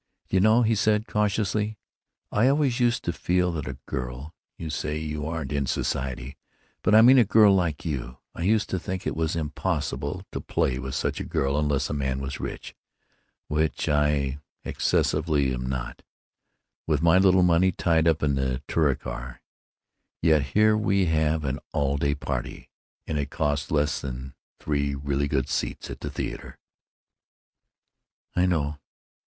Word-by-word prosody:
"Do - - -1
you - - +4
know," 110 +4 +5
he 115 0 +3
said, 105 +1 +2
cautiously, 105 0 0 0.5
"I 115 +4 +3
always 135 -3 +2
used 120 -1 +2
to 85 - -1
feel 90 +2 +1
that 75 -5 -4
a 65 -1 -5
girl—you 65 +5 -7
say 75 0 -2
you 75 -1 -4
aren't 80 -4 -4
in 70 -2 -1
society, 65 0 -3 0.4
but 105 - +3
I 110 - +8
mean 130 +2 +8
a - - +7
girl 105 -1 +6
like 85 -6 0
you—I 65 -1 -6
used 105 +4 +2
to 95 - 0
think 95 +1 -5
it - - -2
was 80 +1 -1
impossible 80 +1 -2
to - - -4
play 65 - 0
with 65 -1 -5
such - - -1
a - - -3
girl 70 0 -1
unless 75 -2 +1
a - - -4
man 65 -2 -1
was 70 0 -5
rich, - - -6 0.7
which 75 +1 -1
I 75 -2 +1 0.3
excessively 70 -5 +1
am 65 0 -3
not, 65 -1 -4 0.9
with 75 -1 +1
my 85 +2 +6
little 95 -1 +5
money 90 +1 +4
tied 80 -2 +2
up 80 -2 +2
in 70 -2 +2
the 65 -1 -1
Touricar. 65 -5 -1 0.8
Yet 80 -2 +4 0.2
here 110 0 +5
we 100 -3 +2
have 80 -1 +1
an 70 +1 -2
all 70 -1 +1
day 70 +1 +1
party, 70 - -5 0.3
and 75 -2 -2
it 70 -1 -2
costs 75 -2 -1
less 75 -3 +1
than 65 0 -6 0.3
three 70 -1 -1
really 70 +1 -1
good 65 -3 0
seats - - -3
at - - -7
the - - -5
theater." - - -6 1.8
"I 90 +1 +3
know. 75 -4 -1
75 Hz, 160 wpm, -26 LUFS, 70-95 Hz, 1.8 s, I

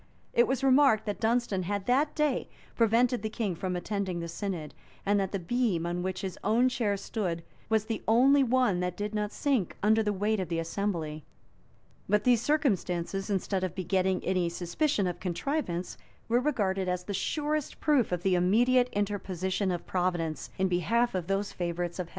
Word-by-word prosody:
It 240 - +4
was 265 0 -1
remarked, 265 -5 +5
that 205 -2 -3
Dunstan 230 -4 +1
had 200 +2 -3
that 275 +5 +2
day 300 -4 0 0.3
prevented 235 +1 +3
the 220 - -2
king 215 -3 -2
from 180 +2 -3
attending 185 0 -2
the 170 - -4
synod, 170 -3 -4 0.3
and 205 +1 +3
that 195 -1 -1
the 200 - -1
beam 190 -2 0
on 175 +1 -2
which 185 0 -3
his 190 -2 -5
own 235 +5 +3
chair 220 -5 0
stood 180 -5 -3 0.3
was 220 -1 +2
the 225 0 -3
only 265 +5 +5
one 250 -7 +2
that 180 0 -2
did 210 +1 -3
not 210 -1 -1
sink 265 - 0
under 220 +1 +4
the 210 -1 0
weight 205 +2 0
of 185 - -3
the 165 - -1
assembly;[] 165 -3 -3 0.9
but 210 +1 +3
these 245 -2 +4
circumstances, 195 - 0
instead 195 -1 -1
of 185 - -3
begetting 190 0 0
any 180 -2 +1
suspicion 190 - 0
of 180 -1 -3
contrivance, 185 - -3 0.3
were 235 +2 +3
regarded 195 -9 0
as 180 0 -1
the 200 - -5
surest 300 - -2
proof 285 -10 +2
of 180 -1 -2
the 190 - +2
immediate 240 +8 +3
interposition 195 -2 -1
of 175 -1 -3
Providence 175 -5 -1
in 190 - +2
behalf 210 +7 +1
of 180 -3 -2
those 195 +1 -1
favorites 175 0 -3
of 180 - -2
Heaven. - - -20
200 Hz, 185 wpm, -29 LUFS, 180-235 Hz, 0.9 s, remarked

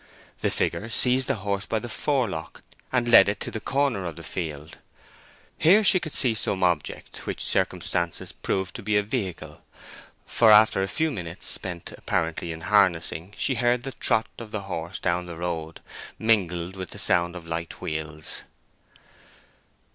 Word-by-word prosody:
The - - +1
figure 115 - -1
seized 125 +3 +3
the - - +1
horse 100 -1 -3
by 115 - 0
the 115 +2 -4
forelock, 115 - -2 0.3
and 125 -2 +1
led 100 -4 +8
it 105 0 -2
to - - -4
the 110 - -4
corner 135 -5 0
of 85 -2 -5
the - - -10
field. 80 -3 -5 0.8
Here 190 +7 +6
she 185 -2 +5
could 155 -4 -6
see 125 -4 +2
some 100 -3 0
object 85 -5 -1
which - - -3
circumstances 85 -1 0
proved 95 -1 -2
to - - -8
be 105 +1 +1
a 105 - +2
vehicle, 95 - -4 0.6
for 115 - +4
after 105 -2 +7
a 95 - 0
few 155 +11 0
minutes 90 - -7
spent 90 -3 -4
apparently 85 +1 -2
in 80 0 -7
harnessing, 95 -1 +2
she 135 - +1
heard 120 0 +1
the 135 - -4
trot 110 -3 +1
of 115 -2 -8
the 105 -1 -3
horse 90 -2 -5
down 90 +1 -1
the 85 -2 -7
road, 80 -2 -4 0.4
mingled 95 -5 +1
with 95 -2 -6
the - - -10
sound 85 +1 +3
of 85 -2 -8
light 85 0 -5
wheels. 75 0 -4
95 Hz, 170 wpm, -25 LUFS, 85-115 Hz, 0.8 s, led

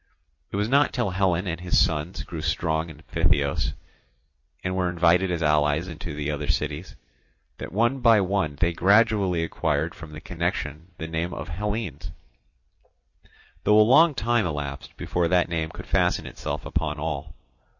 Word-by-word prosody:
It - - -4
was 105 +1 0
not 140 +4 +3
till 120 -6 0
Hellen 95 -1 +1
and 85 -1 -3
his 90 0 +1
sons 80 +2 0
grew - - -7
strong 80 0 -1
in 80 0 -13
Phthiotis, 70 -3 +1 0.9
and 95 0 -2
were 90 -1 +1
invited 90 +2 +3
as 85 -2 -1
allies 75 +2 +2
into 85 -2 -7
the 75 0 -2
other 75 0 -4
cities, 75 +4 -2 0.6
that - - -6
one 120 +7 +1
by 115 -3 +6
one 95 -6 0
they 85 +3 +1
gradually 100 -2 +3
acquired 80 - -1
from 80 -2 -11
the 75 - -7
connection 85 -2 -3
the 80 - -5
name 80 +2 -3
of - - -6
Hellenes; 95 - -4 1.5
though 105 0 +5
a - - +8
long 150 +7 +5
time 115 -4 +1
elapsed 75 -3 -5
before 85 -1 0
that 90 0 +2
name 80 -2 -2
could - - -10
fasten - - +1
itself - - -5
upon 80 -3 -2
all. 75 -2 -4
85 Hz, 160 wpm, -25 LUFS, 80-100 Hz, 1.5 s, a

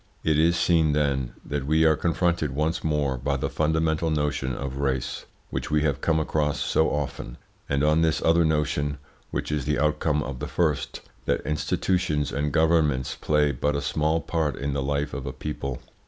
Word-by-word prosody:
It 75 -1 +2
is 85 +2 +4
seen, 80 -4 +3
then, 70 -4 0
that 70 -1 -3
we 80 +1 +4
are 80 -1 +5
confronted 85 -4 0
once 80 +3 0
more 75 -4 0
by 70 +2 -1
the - - -2
fundamental 80 +1 +1
notion 75 -4 0
of 70 +1 -5
race, 65 -3 -2 0.2
which - - -3
we 75 0 +2
have 70 -4 0
come 80 -1 +2
across 75 -2 0
so 80 - +2
often, 70 -4 -4 0.3
and 70 0 +1
on 75 +2 +4
this 80 -1 +2
other 85 +1 +4
notion, 75 -2 0 0.3
which - - -3
is 75 -3 -1
the 75 0 +1
outcome 75 +1 +1
of 65 -2 -6
the 75 - -4
first, 80 -4 -1 0.2
that - - 0
institutions 75 0 0
and 75 +1 -1
governments 80 -5 +2
play 75 -1 +2
but 75 +3 -1
a - - +1
small 80 +2 +1
part 80 -5 -1
in 70 0 -3
the 70 - -1
life 70 +1 -1
of 70 - -5
a - - -2
people. 70 -4 -4
75 Hz, 185 wpm, -25 LUFS, 70-80 Hz, 0.3 s, are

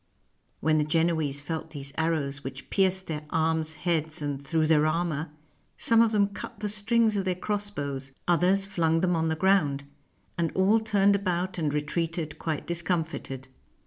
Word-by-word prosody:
When 155 0 +3
the - - +3
Genoese 155 -2 +1
felt 160 +2 -4
these 140 -3 -8
arrows, 150 -4 -1
which 135 0 -8
pierced 190 -1 +2
their 150 -2 -4
arms, 160 0 0
heads, 160 0 -1
and 145 -2 -3
through 160 +3 +1
their 155 -1 +4
armor, 160 -1 -1 0.5
some 230 0 +4
of 230 -1 +4
them 205 -2 +3
cut 205 +2 -8
the 210 -1 -2
strings 220 +1 +2
of 195 - 0
their 185 -1 0
crossbows, 175 -10 -3 0.2
others 180 +3 +3
flung 165 -4 +1
them 180 -1 +2
on 160 0 +1
the 160 - 0
ground, 155 -6 +2 0.6
and 165 -2 +1
all 195 +4 +4
turned 205 -2 +3
about 185 -2 -1
and 155 -3 0
retreated 155 +1 -2
quite 160 -3 -3
discomfited. 165 -6 -2
165 Hz, 165 wpm, -27 LUFS, 150-190 Hz, 0.6 s, their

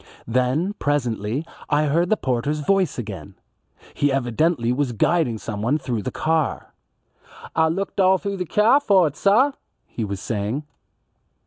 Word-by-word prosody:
Then 130 - 0
presently 125 -2 -1 0.2
I 150 +1 +3
heard 170 +5 +1
the 215 - +3
porter's 135 - -1
voice 190 +1 +1
again. 100 -4 -7 0.6
He 145 -1 +1
evidently 130 0 +1
was 130 -2 -1
guiding 125 0 +1
someone 110 +6 -1
through 125 -7 -3
the - - -3
car. 160 -1 -1 0.8
"Ah 160 0 +4
looked 190 +5 -3
all 190 0 +5
through 200 0 -4
the 180 -2 -4
kyar 225 - +4
for 195 -10 +4
it, 150 -2 -2
sah," 225 - +4 0.3
he 115 - -5
was 100 -2 -4
saying. 110 +7 -3
145 Hz, 145 wpm, -22 LUFS, 120-180 Hz, 0.8 s, all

